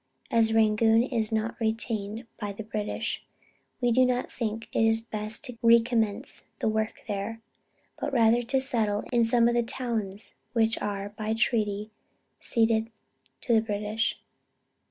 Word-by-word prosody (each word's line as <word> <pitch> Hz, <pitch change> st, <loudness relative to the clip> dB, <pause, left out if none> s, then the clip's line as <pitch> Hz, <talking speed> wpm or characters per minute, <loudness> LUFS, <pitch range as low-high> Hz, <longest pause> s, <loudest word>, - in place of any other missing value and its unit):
As 225 Hz, -1 st, +3 dB
Rangoon 225 Hz, +1 st, +4 dB
is 230 Hz, -4 st, -1 dB
not 220 Hz, +1 st, -1 dB
retained 220 Hz, -1 st, -2 dB
by 205 Hz, -2 st, -3 dB
the 220 Hz, -, -7 dB
British, 210 Hz, -1 st, -3 dB, 0.6 s
we 245 Hz, -2 st, +2 dB
do 255 Hz, +2 st, +5 dB
not 250 Hz, 0 st, 0 dB
think 225 Hz, -1 st, -3 dB
it 225 Hz, 0 st, +3 dB
best 215 Hz, +3 st, -4 dB
to 250 Hz, -5 st, -5 dB
recommence 230 Hz, -3 st, +2 dB
the -, -, -1 dB
work 220 Hz, 0 st, -1 dB
there, 205 Hz, +2 st, -3 dB, 0.6 s
but 290 Hz, -, -2 dB
rather 235 Hz, -2 st, +4 dB
to 265 Hz, +3 st, 0 dB
settle 220 Hz, -6 st, +1 dB
in 235 Hz, -1 st, +4 dB
some 235 Hz, 0 st, +4 dB
of 240 Hz, -, +2 dB
the 240 Hz, -, +3 dB
towns 225 Hz, -4 st, -3 dB, 0.2 s
which 225 Hz, -1 st, +2 dB
are 200 Hz, -1 st, -3 dB
by 215 Hz, +1 st, -3 dB
treaty 215 Hz, -2 st, 0 dB, 0.5 s
ceded 225 Hz, -1 st, +2 dB, 0.5 s
to 240 Hz, -, +1 dB
the 220 Hz, -, +5 dB
British.... 210 Hz, +1 st, -1 dB
225 Hz, 145 wpm, -27 LUFS, 215-235 Hz, 0.6 s, do